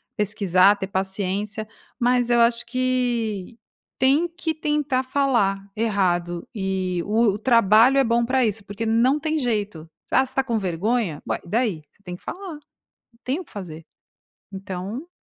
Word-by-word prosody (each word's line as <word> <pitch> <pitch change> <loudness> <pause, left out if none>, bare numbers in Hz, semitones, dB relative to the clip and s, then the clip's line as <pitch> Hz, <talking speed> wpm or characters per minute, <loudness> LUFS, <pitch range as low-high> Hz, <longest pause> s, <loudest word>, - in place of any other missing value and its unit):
pesquisar, 200 -2 +3
ter 190 - -4
paciência, 195 +2 -3 0.3
mas 245 0 +2
eu 240 0 +4
acho 235 0 +3
que 240 -4 -1 0.4
tem 280 +7 +3
que 335 -1 -3
tentar 295 -4 0
falar 255 -8 +1
errado 180 -6 0
e 190 -3 -2
o 215 0 +2
o - - -3
trabalho 230 +2 +5
é 275 - +5
bom 235 -1 +2
pra 255 +1 +2
isso, 215 -1 -2
porque 205 +3 -5
não 240 +6 +3
tem 315 +1 -1
jeito. 210 - -2 0.2
"S - - -3
Ah, - - +6
você 260 - -12
está 270 - 0
com 235 -4 -1
vergonha? 190 -1 -1
Ué? - - -1
E 170 - -14
daí?" 215 -8 0
Você - - -34
tem 180 -3 -7
que - - -17
falar, - - -6
não 295 - -10 0.6
tem 265 +6 -1
o - - -6
que - - -23
fazer. 165 -6 -8 0.7
Então 195 - -6
220 Hz, 170 wpm, -23 LUFS, 195-255 Hz, 0.7 s, Ah